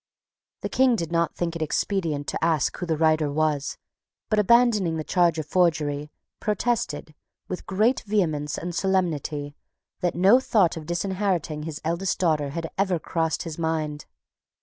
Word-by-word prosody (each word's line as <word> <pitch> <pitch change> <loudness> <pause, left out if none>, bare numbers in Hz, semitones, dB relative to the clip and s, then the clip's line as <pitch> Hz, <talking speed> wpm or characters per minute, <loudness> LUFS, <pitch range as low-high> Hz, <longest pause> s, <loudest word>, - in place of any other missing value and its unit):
The - - -3
King 260 -2 +4
did 170 -6 -3
not 170 -1 +1
think 170 -1 -2
it 170 - -5
expedient 155 -2 -1
to - - -3
ask 160 -4 +2
who 175 - -5
the 160 -2 0
writer 155 -1 +3
was, 150 -1 0 0.5
but, 215 - +3
abandoning 210 -6 +4
the 155 - -3
charge 175 -1 +2
of 155 - -3
forgery, 150 -3 +1 0.3
protested, 210 -8 -1 0.3
with 185 - -6
great 215 +7 +2
vehemence 155 -8 0
and 175 +1 -4
solemnity, 155 -6 -1 0.4
that 175 -2 0
no 195 +8 +6
thought 205 -9 +2
of 155 -2 -8
disinheriting 175 -3 -1
his 150 - -6
eldest 170 +3 0
daughter 155 -5 +1
had 165 +3 -5
ever 190 -3 +2
crossed 160 0 -1
his 165 -1 -7
mind. 155 -2 -2
165 Hz, 155 wpm, -25 LUFS, 155-190 Hz, 0.5 s, no